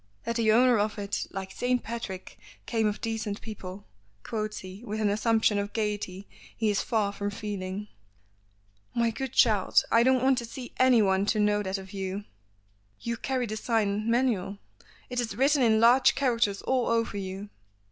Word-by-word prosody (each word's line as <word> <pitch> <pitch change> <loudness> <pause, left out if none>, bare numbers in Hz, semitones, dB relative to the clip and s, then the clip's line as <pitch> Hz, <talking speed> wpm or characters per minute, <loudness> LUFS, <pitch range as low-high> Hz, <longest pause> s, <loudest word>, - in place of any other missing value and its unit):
"That 235 - -2
the 220 -2 +3
owner 240 0 +5
of 210 +1 -1
it, 200 -1 -3
like 190 0 -6
St. 250 0 0
Patrick, 215 -5 -6 0.3
came 225 -2 +1
of 210 0 -3
decent 220 -2 -3
people," 200 -3 -8 0.4
quotes 215 -1 -3
he 190 +4 -10
with 215 -2 -4
an 210 -2 +2
assumption 220 -1 +2
of 200 0 -4
gaiety 205 -3 -3 0.3
he 220 -2 +2
is 200 - +1
far 215 -3 0
from 200 0 -3
feeling. 205 -1 -5 1.1
"My 235 -1 +2
good 265 +2 -4
child, 215 -7 +4
I 230 - +6
don't 260 +1 +3
want 265 -1 +4
to 235 - -5
see 245 +1 -9
anyone 205 -6 +4
to 215 - +1
know 210 0 +2
that 190 -1 -2
of 190 +1 -10
you. 195 +1 -4 0.8
You 235 0 -3
carry 255 +1 -2
the 215 -1 -4
sign 215 -1 0
manual. 230 -5 +1 0.5
It 250 - -1
is 240 -2 -2
written 280 +2 +3
in 220 -3 +4
large 240 +3 +5
characters 230 -7 +1
all 255 -2 +1
over 230 -2 0
you." 195 +1 -5
215 Hz, 175 wpm, -28 LUFS, 200-235 Hz, 1.1 s, I